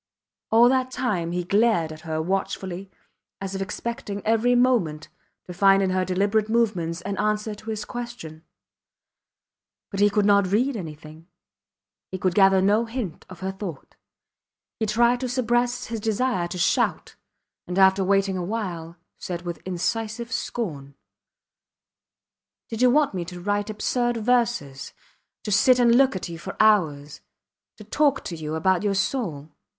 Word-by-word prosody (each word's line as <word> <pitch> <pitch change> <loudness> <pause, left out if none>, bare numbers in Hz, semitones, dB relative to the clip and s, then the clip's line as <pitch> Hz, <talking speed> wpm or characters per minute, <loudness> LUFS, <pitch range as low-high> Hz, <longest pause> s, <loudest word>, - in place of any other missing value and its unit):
All 230 +2 +6
that 260 0 +1
time 210 -10 -2
he 180 0 -2
glared 200 -3 +2
at 155 0 -10
her 160 -2 -3
watchfully 190 +1 -3 0.5
as 195 0 -5
if 195 - -4
expecting 205 0 -5
every 225 +3 +3
moment 230 -12 +1 0.4
to 180 - -8
find 195 +2 +4
in 190 - 0
her 185 0 +1
deliberate 200 +4 0
movements 185 -8 0
an 200 +2 -4
answer 210 0 0
to 215 +2 -10
his 215 -1 -4
question. 235 -11 -8 1.5
But 195 - -4
he 205 0 +5
could 205 0 +1
not 200 -2 +3
read 250 +6 +1
anything, 155 -3 -9 0.8
he 185 - -5
could 185 -1 0
gather 195 -1 +5
no 210 +4 +3
hint 225 -8 -6
of 185 -1 -12
her 190 0 -2
thought. 190 -7 -8 0.8
He 220 - 0
tried 235 +3 +3
to 255 -1 -3
suppress 245 0 0
his 230 0 -4
desire 220 -3 0
to 180 - -6
shout, 175 - 0 0.5
and 180 - -4
after 190 0 +5
waiting 195 0 +1
awhile, 175 -4 -4 0.2
said 175 -1 -5
with 175 -2 -6
incisive 225 +6 -3
scorn: 150 - -4 1.7
Did 225 0 -4
you 250 - +6
want 290 0 +3
me 180 -2 -3
to 180 +1 -8
write 205 +3 -1
absurd 240 +3 -1
verses; 230 - 0 0.5
to 210 - -4
sit 245 +5 +5
and 240 -1 +4
look 265 -1 +4
at 185 - -4
you 170 -1 -8
for 190 - -7
hours 155 -10 +2 0.6
to 210 - -11
talk 275 +5 +1
to 175 - -5
you 155 -1 -5
about 185 +3 +2
your 205 -1 0
soul? 185 - -2
200 Hz, 155 wpm, -24 LUFS, 180-235 Hz, 1.7 s, All